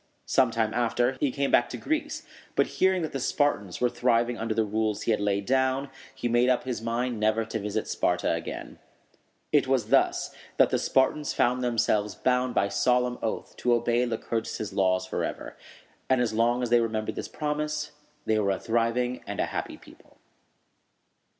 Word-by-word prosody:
Some 130 -3 +3
time 115 -1 -1
after, 120 +2 +1
he 145 - +2
came 140 +1 -1
back 120 - +4
to - - -5
Greece; 315 0 -2 0.3
but, - - +4 0.2
hearing 190 -2 +4
that 155 - -3
the 135 - -3
Spartans 125 - 0
were 125 - +3
thriving 120 0 +1
under 115 -1 -3
the 110 0 +2
rules 110 0 -1
he - - +1
had 110 - +2
laid 100 -1 0
down, 130 +2 +1 0.2
he - - -2
made 120 +1 +3
up 125 - +2
his 125 -3 -4
mind 115 0 -2
never 110 +1 +2
to 110 0 -4
visit 105 0 -3
Sparta - - 0
again. - - -6 0.7
It - - +3
was - - +1
thus - - +2 0.2
that - - +5
the - - +2
Spartans 140 +3 +1
found 125 +1 +2
themselves 110 -4 +1
bound 125 0 +1
by 100 - +3
solemn 125 +5 +1
oath 110 - -4
to 120 -1 +2
obey 120 +1 +1
Lycurgus' 115 -2 -3
laws 95 -1 +2
forever; 95 - -4 0.5
and 130 -1 +4
as 120 -3 0
long 120 +2 +2
as 120 - -2
they 120 -1 +5
remembered 110 -1 -2
this - - -5
promise, 150 0 -3 0.3
they 110 -1 +2
were 100 -2 +1
a 95 - 0
thriving 120 +2 0
and - - -5
happy - - -3
people. - - -19
120 Hz, 180 wpm, -27 LUFS, 110-125 Hz, 0.7 s, that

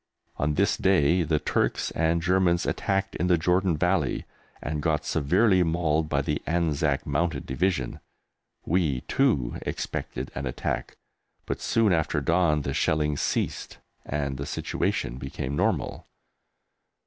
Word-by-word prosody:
On 75 0 0
this - - +2
day 90 -2 +3
the 80 -1 +1
Turks 75 - 0
and 85 +1 +1
Germans 90 -1 +2
attacked 95 0 -1
in 90 - 0
the 90 -1 +4
Jordan 90 0 +2
Valley - - +1 0.3
and 75 +1 -3
got - - 0
severely 90 +6 +3
mauled 80 -2 +1
by 70 -1 +1
the 75 +1 -1
Anzac 75 -4 0
Mounted 80 +4 -1
Division. 70 -1 -1 0.7
We, 80 -7 +1
too, 110 - +1
expected 65 +2 -4
an 70 +1 -4
attack, 60 - -3 0.5
but - - -3
soon 110 -4 +2
after 80 -2 +1
dawn 80 -1 +2
the 70 - -2
shelling 75 0 +1
ceased - - -2 0.3
and 70 -2 -2
the 70 +1 -5
situation - - -2
became 65 +1 -4
normal. - - -1
80 Hz, 135 wpm, -26 LUFS, 70-90 Hz, 0.7 s, the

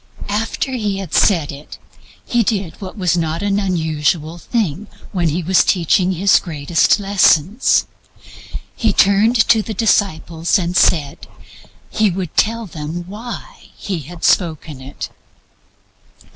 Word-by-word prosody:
After 225 +5 -2
He 210 -6 -2
had 190 -5 -7
said 170 -8 +3
it, 145 +1 -11 0.5
He 240 - +1
did 200 -6 -1
what 190 +2 -8
was 180 -3 +1
not 165 +1 -2
an 205 0 +1
unusual 160 -3 -1
thing 210 - -2 0.2
when 175 -4 0
He 170 +4 -2
was 185 +3 +3
teaching 180 +1 +2
His 190 +3 +4
greatest 165 +4 +1
lessons 195 - +3 0.9
He 220 -4 +1
turned 215 +5 +3
to 225 - +5
the 220 0 -6
disciples 175 -5 +1
and 175 -1 -3
said 145 -5 +1 0.6
He 215 -1 +2
would 180 -3 -5
tell 230 +1 +1
them 165 -1 -6
why 235 - -9
He 190 -4 -4
had 165 +4 -11
spoken 160 -5 0
it. 135 +2 -8
185 Hz, 130 wpm, -18 LUFS, 160-205 Hz, 0.9 s, to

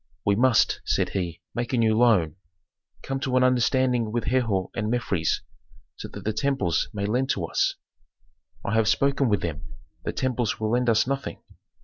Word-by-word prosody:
"We 100 - +3
must," 125 0 +3
said - - 0
he, 85 -4 -4
"make 120 +1 -3
a - - +2
new 110 -2 +3
loan. 100 -9 +3 0.7
Come 135 0 -3
to 130 -1 0
an 125 - +4
understanding 125 -2 +2
with 120 0 -1
Herhor 115 -7 0
and 105 - -2
Mefres, 100 -9 0 0.5
so - - -7
that - - -10
the 110 - -1
temples 110 - 0
may 100 -2 -3
lend 125 +6 0
to 90 -10 0
us." - - 0 0.9
"I 100 - -1
have 110 -1 +3
spoken 140 +3 +2
with 105 -4 +1
them. 80 -4 -3 0.4
The - - -2
temples 125 -3 -1
will 110 0 -1
lend 125 0 +2
us 110 -1 +3
nothing." 135 +1 -4
115 Hz, 175 wpm, -25 LUFS, 100-130 Hz, 0.9 s, an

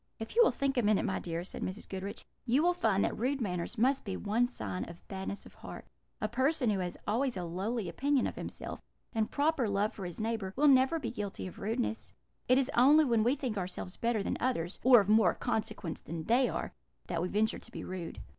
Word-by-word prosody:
"If 225 - -7
you 475 - +7
will - - +5
think 275 -1 -1
a - - +5
minute, 210 -2 +2
my 190 - -1
dear," 170 0 -3
said 185 - -6
Mrs. 190 +4 -4
Goodriche, 195 +1 -6 0.2
"you 260 +5 +2
will 355 +1 +4
find 220 - +2
that - - -1
rude 265 +4 0
manners 180 -1 -2
must 260 +5 +2
be 195 -3 -4
one 225 +4 +1
sign 95 - -4
of 170 0 -13
badness 195 +1 -5
of - - -14
heart: - - -9 0.3
a - - 0
person 265 -3 +1
who 200 - 0
has 180 -1 -3
always 240 +1 +1
a 180 - -3
lowly 190 +5 -2
opinion 270 - +1
of - - -3
himself, - - -6 0.3
and 220 -2 0
proper 290 -5 +1
love 200 +2 +1
for 195 - -7
his 175 +3 -6
neighbour, 220 -4 -2
will 295 +3 +4
never 265 +3 +5
be 310 - -3
guilty 205 -4 -5
of 185 - -8
rudeness; 225 +1 -2 0.3
it 255 - +5
is 270 +1 +1
only 290 +6 +6
when 230 -4 +3
we 245 +4 +3
think 250 -7 -3
ourselves 180 0 -5
better 230 -3 0
than - - -2
others, 200 -9 -1
or 245 -3 +8
of 200 - -4
more 215 +1 +5
consequence 220 -8 -3
than 165 0 -5
they 245 +7 +3
are, - - -4 0.3
that 170 -2 -2
we 180 - 0
venture 215 +4 +1
to 235 - -13
be - - -6
rude. 180 -3 -6
220 Hz, 230 wpm, -32 LUFS, 190-255 Hz, 0.3 s, or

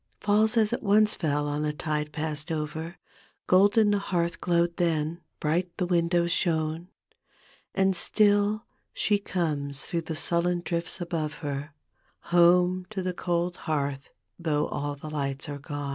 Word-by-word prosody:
Falls 215 +3 +2
as 220 0 +3
it - - -2
once 210 +1 +4
fell 145 -2 -1
on 145 +1 -1
a 150 - 0
tide 150 0 -3
past 155 +1 -3
over, 160 +2 -4 0.5
Golden 205 +3 +5
the 205 - +2
hearth 170 -3 -1
glowed 170 -1 +1
then, 165 -1 0 0.2
bright 170 +4 0
the 180 - 0
windows 170 0 +2
shone; 160 0 0 0.9
And 190 -1 +3
still, 205 +3 +2 0.3
she 205 -1 +2
comes 150 -8 -2
through 170 - -2
the 160 0 -5
sullen 175 +2 +1
drifts 170 +2 -1
above 165 -3 -2
her 145 +1 -4 0.6
Home 180 +1 +4
to 200 -3 -4
the 185 0 -1
cold 175 0 -1
bcaith 140 -3 -2 0.3
though 155 -3 +1
all 145 0 -3
the 145 +2 -9
lights 140 -3 -3
are 145 -1 -5
gone. 145 0 -5
170 Hz, 150 wpm, -27 LUFS, 150-185 Hz, 0.9 s, Golden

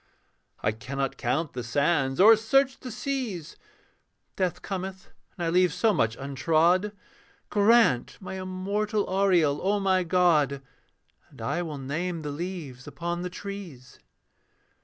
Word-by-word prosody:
I 105 - +2
cannot 135 +5 -4
count 140 +6 -1
the 125 - -4
sands 140 +3 +1
or 220 +4 +9
search 260 +5 +2
the 255 - -7
seas, 235 - -4 0.8
Death 185 -3 -1
cometh, 190 -1 -6 0.3
and 175 - -2
I - - +1
leave 180 0 +3
so 220 +7 +2
much 115 - 0
untrod. 165 +8 +2 0.6
Grant 210 - +4
my 190 -1 -6
immortal 200 +3 -2
aureole, 180 -7 +2
O 205 +2 +1
my 190 -2 +2
God, 160 -6 +2 0.7
And - - -18
I 175 - -1
will 155 -4 -5
name 160 +5 -3
the 145 - -4
leaves 150 -5 -6
upon 175 0 -4
the 180 - -3
trees. 180 -9 -9
175 Hz, 135 wpm, -27 LUFS, 145-195 Hz, 0.8 s, or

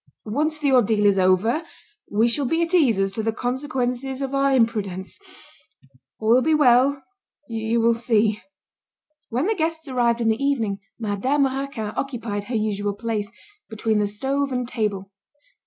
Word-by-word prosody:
Once 300 +8 -1
the 290 -2 +1
ordeal 220 -4 +3
is 200 -1 +4
over, 185 - +2 0.5
we 220 +3 +2
shall 265 +3 0
be 325 +5 +1
at 335 +2 -3
ease 275 - +4
as 195 0 +1
to 220 - -2
the 225 +1 0
consequences 255 +1 -2
of 270 0 -4
our 275 0 +2
imprudence. 210 -7 0 1.0
All 220 - -1
will 245 +3 +6
be 315 +3 +2
well, 270 0 +4 0.4
you 225 0 -1
will 230 +1 +4
see." 220 -2 +1 0.9
When 250 +6 -1
the 440 - +2
guests 320 -4 -2
arrived 240 -3 +1
in 230 -1 +1
the 220 +5 0
evening, 225 -8 0 0.2
Madame 235 +7 0
Raquin 265 -5 -3
occupied 230 -6 -3
her 240 - -4
usual 205 -2 -1
place, 215 -1 -3 0.4
between 220 -1 0
the 205 - +1
stove 270 +7 -2
and 250 -1 -2
table. 205 -5 -3
235 Hz, 160 wpm, -23 LUFS, 215-275 Hz, 1.0 s, will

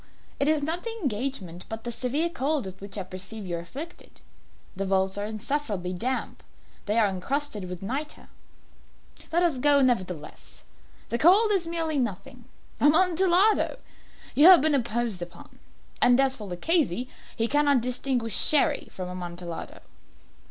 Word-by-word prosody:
It 280 - +1
is 305 -1 +2
not 325 +4 -1
the 465 - -3
engagement, 210 - -3
but 225 0 -6
the 240 - -4
severe 265 +7 0
cold 290 -3 -1
with 190 0 -8
which 200 +1 -7
I 195 - -3
perceive 190 +3 -4
you 175 -2 -3
are - - -4
afflicted. 280 - -10 0.5
The 195 +1 -3
vaults 190 0 +1
are 205 +1 -2
insufferably 215 -5 -3
damp. 255 +9 -3 0.5
They 210 +2 +1
are 220 -2 +4
encrusted 210 +1 -3
with 180 0 -7
nitre." 280 +9 -5 1.0
"Let 345 +2 +2
us 320 -7 +1
go, 285 +1 +4
nevertheless. 185 - -2 0.5
The 235 - -2
cold 410 +7 +5
is 375 -5 +1
merely 325 -3 0
nothing. 245 +2 -5 0.3
Amontillado! 365 +6 +3 0.6
You 300 +4 +7
have 365 -2 +9
been 310 0 +2
imposed 235 -6 -1
upon. 175 0 -11 0.4
And 245 +1 +5
as 270 -1 +2
for 210 -5 -8
Luchesi, 250 - 0 0.3
he 225 - 0
cannot 285 -1 +3
distinguish 245 -2 -1
Sherry 300 0 +3
from 185 -1 -6
Amontillado." 175 -1 -7
245 Hz, 150 wpm, -26 LUFS, 195-295 Hz, 1.0 s, have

